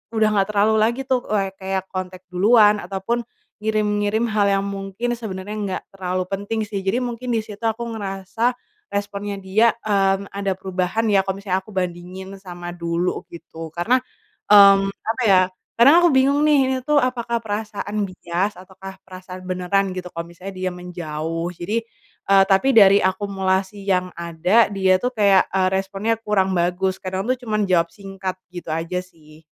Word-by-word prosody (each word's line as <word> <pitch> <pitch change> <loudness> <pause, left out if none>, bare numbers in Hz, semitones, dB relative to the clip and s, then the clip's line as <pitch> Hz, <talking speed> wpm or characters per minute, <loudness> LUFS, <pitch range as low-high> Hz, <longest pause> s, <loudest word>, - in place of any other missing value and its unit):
udah 220 -1 +3
nggak 195 -2 +2
terlalu 210 +1 +2
lagi 235 +4 +1
tuh, 260 -2 -1
eee, 195 -2 0
kayak 190 -1 -2
kontak 185 -1 -5
duluan, 210 +2 +5
ataupun 195 +5 -2 0.4
ngirim-ngirim 215 +1 0
hal 205 -1 +2
yang 195 0 +2
mungkin 200 +4 -4
sebenarnya 205 -3 -6
nggak 200 -3 -3
terlalu 185 -1 -2
penting 205 +3 -2
sih. 200 -2 -4
Jadi 195 +6 +1
mungkin 245 0 -4
di 230 - +2
situ 210 +1 -11
aku 225 +1 -1
ngerasa, 205 +4 -2 0.4
responnya 205 0 -3
dia, 215 +5 +3
mmm, 195 -1 +1
ada 200 -1 -2
perubahan 190 +4 -1
ya, 195 -2 +3
kalo 195 0 -3
misalnya 190 -1 -1
aku 215 - -13
bandingin 185 +1 -5
sama 175 -2 -8
dulu 170 +1 -2
gitu. 165 -1 -9
Karena, 175 +10 +2 0.5
mmm, 195 -1 +8
apa 230 +5 -3
ya, 190 -3 +6 0.4
karena 245 +4 +8
aku 345 - +6
bingung 275 +3 +3
nih, 300 -2 +5
ini 265 - +1
tuh 300 -1 +4
apakah 235 -2 -1
perasaan 210 -1 -3
bias 185 +1 -2
ataukah 190 0 -11
perasaan 185 0 -10
beneran 185 +2 0
gitu 180 -1 -6
kalo 170 0 -5
misalnya 185 +3 -9
dia 185 0 -2
menjauh. 165 -1 -4
Jadi, 180 +5 -3 0.5
eee, 195 -1 +7
tapi 195 +7 +3
dari 200 -2 +8
akumulasi 190 +1 -1
yang 180 -1 +1
ada 170 +7 +2
dia 190 -2 +2
tuh 250 - +1
kayak, 200 -3 +4
eee, 190 -1 +1
responnya 195 +3 -1
kurang 195 -3 +1
bagus, 185 +2 0
kadang 190 +1 -3
tuh 255 +2 0
cuman 215 -3 0
jawab 170 -3 +2
singkat, 190 0 -6 0.2
gitu 175 -2 -7
aja 165 +3 -2
sih. 160 -3 -19
195 Hz, 165 wpm, -21 LUFS, 185-215 Hz, 0.5 s, mmm